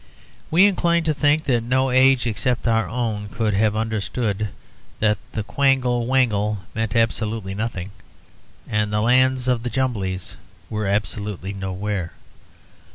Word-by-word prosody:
We 175 +5 +6
incline 170 -4 +2
to 160 -1 +1
think 150 +1 +2
that 120 -4 +1
no 130 +3 +1
age 130 -1 +4
except 120 +2 -1
our 115 -1 +2
own 110 -4 -2
could 110 -2 -1
have 105 +1 +2
understood 110 -1 -2 0.5
that 105 -1 +2
the 110 - -2
Quangle 125 -1 +1
Wangle 105 -5 +2 0.2
meant 110 -2 -2
absolutely 110 -3 0
nothing, 100 -3 -4 0.8
and 105 0 0
the 105 0 +1
Lands 130 +2 +3
of 125 -2 +2
the 120 - -3
Jumblies 105 -9 -2 0.3
were 105 -2 -2
absolutely 100 -1 -2
nowhere. 95 -1 -3
115 Hz, 135 wpm, -22 LUFS, 105-130 Hz, 0.8 s, We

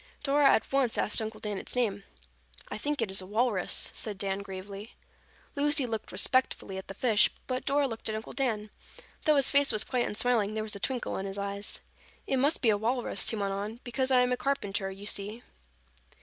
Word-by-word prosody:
Dora 285 0 +5
at - - +2
once 270 -4 +2
asked 210 - +2
Uncle 220 0 -5
Dan 210 -2 -3
its - - -4
name. 205 -5 0 0.6
"I - - -4
think 290 +5 -2
it 200 - -3
is 190 - +2
a 185 - -10
walrus," 215 -2 +1
said 210 -3 -2
Dan 195 0 -2
gravely. 200 +2 -8 0.6
Lucy 290 -1 +4
looked 225 -3 -4
respectfully 195 -1 0
at 190 - -10
the 195 - -7
fish 225 -4 +4 0.2
but 255 -1 -3
Dora 285 0 +2
looked 225 -2 -5
at 215 - -2
Uncle 220 - -6
Dan. 215 -6 -1 0.5
Though 305 -2 +5
his 275 -2 +4
face 280 -1 +5
was 215 -1 +1
quite 245 -1 0
unsmiling, 220 -1 +1
there 215 - -1
was 215 -1 -1
a - - -6
twinkle 255 +3 -2
in 195 - -3
his 195 +1 -6
eyes. 200 +1 -3 0.4
"It 265 - 0
must 285 +4 +2
be 225 - +5
a 205 - +2
walrus," 240 +3 +1
he - - +2
went 200 -2 -1
on, 210 +4 -4
"because 260 +1 -1
I 255 -1 +5
am 250 0 +2
a 250 - +1
carpenter, 205 -8 -1
you 195 +1 -9
see." 210 +3 -2
220 Hz, 210 wpm, -29 LUFS, 200-255 Hz, 0.6 s, Dora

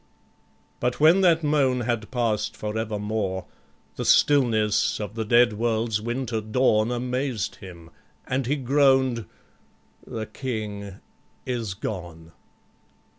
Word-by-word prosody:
But 125 0 -1
when 160 +6 +6
that 165 -3 +4
moan 140 -4 +2
had 120 -2 -2
past 115 -4 -1
for 105 0 -4
evermore, 105 -3 -2 0.5
The - - -2
stillness 115 -8 +3
of 105 -1 -5
the 115 0 -3
dead 120 +1 +4
world's 110 -1 0
winter 120 -1 -2
dawn 110 0 +2
Amazed 125 -2 -2
him, 85 -3 -12 0.3
and 130 -1 -2
he 145 - +1
groan'd, 130 -3 +2 0.8
"The 115 -3 -4
King 105 -6 -5 0.5
is 115 -6 -3
gone." 85 -6 -7
115 Hz, 115 wpm, -25 LUFS, 105-130 Hz, 0.8 s, when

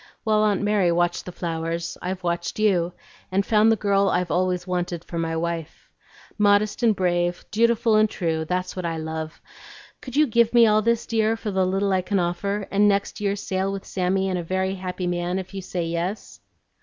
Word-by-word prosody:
While 215 -1 +2
Aunt 205 -1 +1
Mary 205 -4 +2
watched 175 0 0
the 180 - -6
flowers, 165 -1 -3
I've 185 +1 -4
watched 170 0 -2
you, 180 -5 +2 0.4
and 195 +1 +1
found 220 0 +4
the - - +4
girl 200 -1 +2
I've 180 -1 0
always 180 +1 0
wanted 175 -2 -3
for 170 - -5
my 165 0 -1
wife. 165 -1 -4 0.5
Modest 205 +1 +3
and 225 -3 +3
brave, 175 -1 0
dutiful 230 0 +3
and 215 0 +4
true, 165 -5 -2
that's 180 +2 -3
what 185 - -4
I 165 -1 -2
love; 160 0 -5 0.6
could 255 -1 -8
you 305 +1 +5
give 235 -2 +2
me 235 -1 +8
all 215 -1 +4
this, 230 +1 +1
dear, 225 0 +1
for 215 -2 -4
the 190 -1 +1
little 195 +1 0
I 185 - +2
can 200 +2 -1
offer, 195 +3 -1
and 205 +1 +4
next 200 0 0
year 200 -1 0
sail 195 -1 -2
with 195 0 -6
Sammy 190 +1 0
and 185 -1 -1
a - - -4
very 190 +2 -1
happy 185 -1 -4
man 175 +1 -1
if 190 +1 -6
you 195 - -4
say 180 -2 -3
yes?" 170 +5 -4
185 Hz, 205 wpm, -24 LUFS, 175-210 Hz, 0.6 s, me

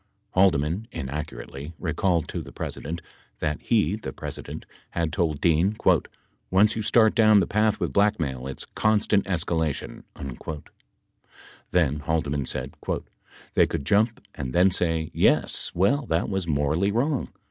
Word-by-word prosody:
Haldeman 90 +2 +2
(inaccurately) 75 +1 -6
recalled 85 0 0
to - - -3
the - - -10
President 80 +3 -5 0.3
that 75 -1 -2
he 105 -6 +2
(the 110 - -6
President) - - -7 0.2
had 85 -2 -2
told 80 -4 0
Dean, 85 +6 +2 0.7
"Once 100 +3 +4
you 110 - -2
start 110 +1 +4
down 110 -2 +6
the 95 - +2
path 105 +2 +1
with - - -2
blackmail 80 -12 +1
it's 65 - -6
constant 110 -1 +2
escalation." 80 -4 -1 1.7
Then 75 -5 +2
Haldeman 75 -2 -1
said: - - -4 0.8
"They - - +4
could 70 - -4
jump 110 +8 +2
and 65 -2 -5
then 95 +2 +5
say, 80 -3 0
'Yes, - - +3
well 125 +10 +2
that 80 +1 0
was 95 -3 -2
morally 75 +6 +1
wrong. 130 +5 0
85 Hz, 135 wpm, -25 LUFS, 75-105 Hz, 1.7 s, down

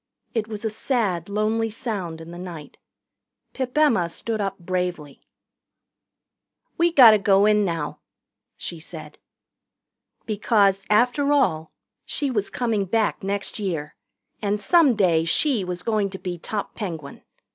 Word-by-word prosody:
It 220 -2 -1
was 215 0 -6
a 220 - 0
sad, 205 - -1
lonely 215 +2 0
sound 195 -8 -5
in 165 +1 -10
the 175 - -9
night. 170 -5 -9 0.7
Pip 260 +1 -4
Emma 230 - +3
stood 220 +5 -3
up 195 -1 -2
bravely. 175 -5 -4 1.5
"We 340 +1 +2
gotter 235 -9 +8
go 195 0 +4
in 210 0 +4
now," 165 -5 -3 0.6
she 170 - -5
said. 155 -2 -10 1.1
Because, 205 -2 +2
after 245 +7 +3
all, 160 - +1 0.3
she 285 -2 -2
was 210 -5 -1
coming 225 -5 -1
back 220 +3 0
next 200 +2 -3
year, 165 -7 -3 0.5
and 205 0 0
some 295 - +4
day 175 -6 +3
she 230 - +1
was 180 -1 -5
going 215 -3 0
to 190 - -7
be 180 -2 -5
top 205 +4 -4
Penguin. 165 -9 -6
200 Hz, 135 wpm, -23 LUFS, 175-225 Hz, 1.5 s, gotter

